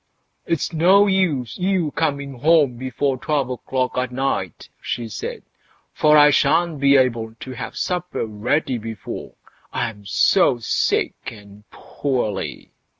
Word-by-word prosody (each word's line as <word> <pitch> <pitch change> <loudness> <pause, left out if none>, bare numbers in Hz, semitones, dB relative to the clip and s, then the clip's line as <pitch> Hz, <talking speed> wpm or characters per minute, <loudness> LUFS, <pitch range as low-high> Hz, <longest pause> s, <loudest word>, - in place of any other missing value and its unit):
"It's 165 +1 -1
no 185 +5 +5
use 185 - 0
your 180 -4 0
coming 140 -4 -2
home 150 -3 +4
before 130 +2 -2
twelve 140 -4 -1
o'clock 130 +1 -2
at 125 -1 -2
night", 125 - -3
she 120 -1 -3
said, 100 -7 -6 0.5
"for 150 0 +4
I 150 0 +7
shan't 165 +1 +2
be 140 0 +5
able 115 -4 0
to 130 - -8
have 125 - -7
supper 180 -7 -2
ready 120 +5 -1
before—I'm 110 -1 -7
so 130 - +3
sick 115 - 0 0.2
and 105 -1 -15
poorly." 125 -8 -4
135 Hz, 125 wpm, -21 LUFS, 115-155 Hz, 0.5 s, I